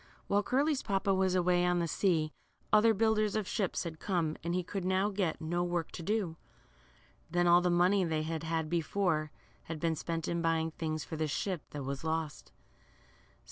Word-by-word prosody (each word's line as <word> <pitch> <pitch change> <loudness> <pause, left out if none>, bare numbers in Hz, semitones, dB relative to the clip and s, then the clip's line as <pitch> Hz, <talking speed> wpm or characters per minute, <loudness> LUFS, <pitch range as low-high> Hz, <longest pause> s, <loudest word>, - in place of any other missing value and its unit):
While 200 +1 +2
Curly's 275 +6 +1
papa 195 -1 +1
was 190 -1 +2
away 180 0 +3
on 180 0 +2
the 170 -1 0
sea, 160 -4 +1 0.4
other 215 +2 +6
builders 215 -1 +2
of 215 -3 -1
ships 200 -5 -1
had 160 -2 -6
come, 170 -5 0
and 170 +1 -1
he 180 - 0
could 190 +2 -4
now 190 +2 +2
get 190 -5 -1
no 175 +2 -1
work 175 -2 -2
to - - -7
do. 190 -3 -1 0.9
Then 175 +1 +2
all 175 0 +6
the 180 - +1
money 180 +3 +4
they 160 -2 0
had 160 0 -3
had 160 -1 -1
before, 165 -1 0 0.4
had 160 -1 -5
been 165 0 +1
spent 165 +1 -3
* - - -6
■ - - -1
in 170 0 -1
buying 165 -1 +1
things 155 -1 -3
for 160 - -6
the 155 0 0
ship 175 +3 -2
that 145 -2 -6
was 140 +2 -4
lost. 160 -2 -3
175 Hz, 200 wpm, -32 LUFS, 160-195 Hz, 0.9 s, other